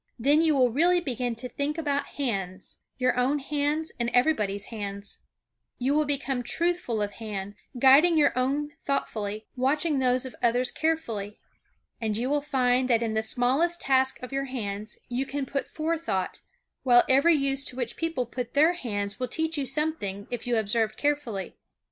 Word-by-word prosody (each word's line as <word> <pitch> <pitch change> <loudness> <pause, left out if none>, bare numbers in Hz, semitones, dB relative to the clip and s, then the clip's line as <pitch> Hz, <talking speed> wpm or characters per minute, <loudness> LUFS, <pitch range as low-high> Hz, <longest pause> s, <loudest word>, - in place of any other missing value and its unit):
Then 285 +6 +4
you 320 -2 +3
will 250 -3 +4
really 345 +8 +3
begin 250 -7 -2
to 250 +3 -5
think 285 +4 -3
about 285 -3 -1
hands; 195 -9 -2 0.2
your 255 -1 +2
own 265 +4 +2
hands 295 +2 -1
and 235 0 +1
everybody's 210 -8 +2
hands. 200 -1 -5 0.6
You 260 +3 0
will 305 0 +2
become 275 -3 -1
truthful 330 -6 0
of 205 - -3
hand, 205 -2 -6 0.2
guiding 280 +7 +6
your 290 -4 +4
own 280 +4 0
thoughtfully; 215 -6 -2
watching 285 +3 +1
those 255 0 +2
of 260 - -8
others 245 +2 +2
carefully. 230 -11 -2 0.6
And 215 -2 0
you 250 +4 -1
will 295 0 +2
find 255 -2 +1
that 235 -1 +3
in 225 -1 -1
the 220 - +1
smallest 265 +10 +2
tasks 265 -1 +2
of 250 - -7
your 275 0 -1
hands 210 -5 -4
you 255 +2 -2
can 285 -1 -3
put 275 +1 -3
forethought, 315 - -2 0.4
while 245 -2 +6
every 280 +6 +5
use 275 -1 0
to - - -4
which 245 -2 -4
people 325 -7 -2
put 245 +1 -6
their 315 +4 +5
hands 205 - -4
will 255 - -1
teach 320 +5 -1
you 280 -3 -1
something 260 -9 -1
if 245 0 -4
you 240 -1 +2
observe 220 +1 0
carefully. 285 -10 -2
260 Hz, 170 wpm, -27 LUFS, 230-290 Hz, 0.6 s, guiding